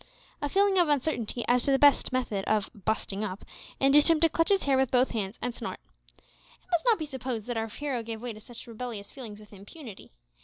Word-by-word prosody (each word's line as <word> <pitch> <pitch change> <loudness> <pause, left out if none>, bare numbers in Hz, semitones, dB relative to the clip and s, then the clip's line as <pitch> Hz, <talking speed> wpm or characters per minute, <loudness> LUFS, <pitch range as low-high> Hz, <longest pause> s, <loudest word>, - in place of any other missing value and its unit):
A 290 - -1
feeling 390 +2 +3
of 345 -3 +4
uncertainty 255 -5 0
as 245 0 +3
to 280 - +1
the 270 - +4
best 285 -1 +4
method 240 -6 -1
of 215 -2 0
"busting 205 0 -2
up" 195 -1 -5 0.3
induced 285 +3 +6
him 325 -2 +4
to 330 - +6
clutch 330 +4 +1
his 395 -1 +3
hair 275 -1 +2
with 265 -1 +2
both 255 0 +3
hands, 210 -2 -3
and 245 - -1
snort. - - -6 0.4
It - - -29
must 345 -2 +1
not 465 -3 +5
be 315 - -4
supposed 255 -6 -4
that 245 - -3
our 225 0 -1
hero 260 +2 -3
gave 225 -1 -6
way 240 0 -5
to 215 - -11
such 235 +2 -11
rebellious 230 -3 -7
feelings 225 -6 -9
with 210 0 -16
impunity. 205 - -11
245 Hz, 225 wpm, -28 LUFS, 215-290 Hz, 0.4 s, induced